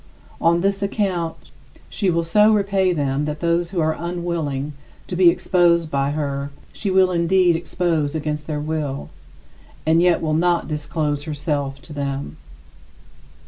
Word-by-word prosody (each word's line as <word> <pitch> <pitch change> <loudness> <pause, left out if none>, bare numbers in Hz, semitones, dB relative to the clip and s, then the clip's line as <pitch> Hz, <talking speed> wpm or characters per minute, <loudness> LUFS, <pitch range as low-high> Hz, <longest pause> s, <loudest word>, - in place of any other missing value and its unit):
On 170 +1 +3
this 195 +1 0
account, 190 -5 -1 0.5
she 195 - 0
will 170 -1 +1
so 210 +6 +4
repay 195 -3 +2
them 145 -3 0
that 150 0 -4
those 170 +1 +1
who 185 -1 -3
are 160 0 +1
unwilling 170 -5 -3 0.3
to 180 - -5
be 180 -1 +6
exposed 170 -2 +2
by 140 0 +1
her 140 -1 -2 0.2
she 205 - -3
will 185 -1 +4
indeed 175 0 +3
expose 165 -2 -1
against 150 -1 -3
their 150 -2 -2
will, 150 -2 -3 0.7
and 160 +1 +4
yet 175 -1 +4
will 155 -1 -1
not 175 +2 +2
disclose 150 -1 -2
herself 145 -3 -2
to 155 - -11
them. 140 - -4
165 Hz, 145 wpm, -21 LUFS, 150-175 Hz, 0.7 s, be